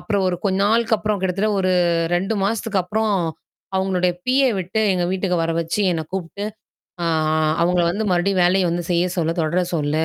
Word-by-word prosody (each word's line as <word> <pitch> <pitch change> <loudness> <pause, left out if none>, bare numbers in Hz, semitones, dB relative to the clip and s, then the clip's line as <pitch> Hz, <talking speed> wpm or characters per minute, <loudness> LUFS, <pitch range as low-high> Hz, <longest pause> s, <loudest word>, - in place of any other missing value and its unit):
அப்புறம் 200 -3 -1
ஒரு 175 - -1
கொஞ்ச 190 -1 +1
நாளுக்கு 225 +1 +2
அப்புறம் 215 -1 -1
கிட்டத்தட்ட 190 +3 0
ஒரு 185 0 +1 0.4
2 195 +5 0
மாசத்துக்கு 215 -1 0
அப்புறம் 215 +3 -1 0.6
அவங்களுடைய 185 -2 +1
பிஏ 265 +1 +3
விட்டு 190 +5 -2
எங்கள் 180 -1 0
வீட்டுக்கு 185 -1 0
வர 165 - -1
வச்சு 165 +5 -2
என்னை 160 -1 -2
கூப்பிட்டு, 190 +2 -4 0.6
ஆ - - 0 0.6
அவங்கள 175 0 +2
வந்து 210 +4 -2
மறுபடியும் 180 +1 +2
வேலையை 185 +1 +3
வந்து 175 0 -2
செய்ய 175 0 +2
சொல்ல 165 -1 +1
தொடர 170 +3 +1
சொல்லு 155 +1 0
185 Hz, 175 wpm, -21 LUFS, 175-210 Hz, 0.6 s, பிஏ